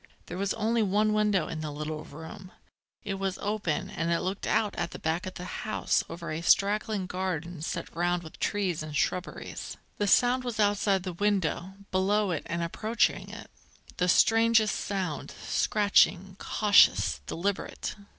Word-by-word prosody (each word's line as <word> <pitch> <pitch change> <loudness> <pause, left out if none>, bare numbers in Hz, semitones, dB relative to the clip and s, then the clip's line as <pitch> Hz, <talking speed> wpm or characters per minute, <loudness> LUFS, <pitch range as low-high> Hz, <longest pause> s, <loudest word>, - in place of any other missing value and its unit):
There 175 - -7
was 200 +1 0
only 225 +1 +1
one 210 +1 +2
window 210 -5 +2
in 160 -1 -5
the 155 - -4
little 155 +1 -5
room; 160 +5 -10 0.5
it 195 -2 -3
was 195 -1 -2
open, 205 -6 -2
and 165 +1 -2
it 170 - +1
looked 190 +2 -3
out 215 -2 +1
at - - -2
the - - -8
back 160 +3 -2
of 185 - -7
the 180 - -7 0.2
house 215 - 0
over 170 -1 -6
a 155 +1 -3
straggling 200 +2 +2
garden 180 -3 -4
set 170 +1 -5
round 175 +1 0
with 160 - -12
trees 190 -6 -1
and 155 -1 -4
shrubberies. 180 +5 -3 0.2
The 205 - +1
sound 245 +5 +4
was 240 -3 -4
outside 205 -2 +2
the 185 -1 -4
window, 190 -1 0 0.2
below 200 +1 +2
it 165 - -1
and 170 0 -2
approaching 215 +7 0
it, - - -10 0.5
the 180 0 +1
strangest 225 +1 +4
sound, 185 -7 -3
scratching, 195 -2 +2
cautious, 205 - +4
deliberate. 195 - -3
190 Hz, 160 wpm, -28 LUFS, 170-210 Hz, 0.5 s, sound